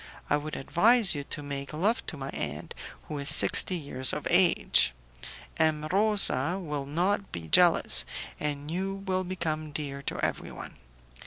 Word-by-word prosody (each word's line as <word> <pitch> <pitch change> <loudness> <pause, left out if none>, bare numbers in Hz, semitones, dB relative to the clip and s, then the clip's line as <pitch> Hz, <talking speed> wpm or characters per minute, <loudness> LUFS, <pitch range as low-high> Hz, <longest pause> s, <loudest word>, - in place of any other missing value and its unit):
I - - +5
would 150 +1 -6
advise 215 - +3
you 145 -2 -4
to 145 - -6
make 140 0 -6
love 205 +10 0
to 160 - -4
my 135 0 -6
aunt, 75 +1 -6 0.3
who 150 - -7
is 140 - 0
sixty 185 - +4
years 140 -5 0
of 150 - -5
age; 175 - +4 0.6
M. 155 -1 0
Rosa 195 -6 +4
will 150 -6 -5
not 185 +7 -1
be 85 -2 -7
jealous, - - +4 0.4
and 145 0 -4
you 190 +3 -3
will 185 -1 -1
become 160 -4 -4
dear 140 -2 -5
to - - -4
everyone. - - -6
155 Hz, 155 wpm, -27 LUFS, 140-185 Hz, 0.6 s, I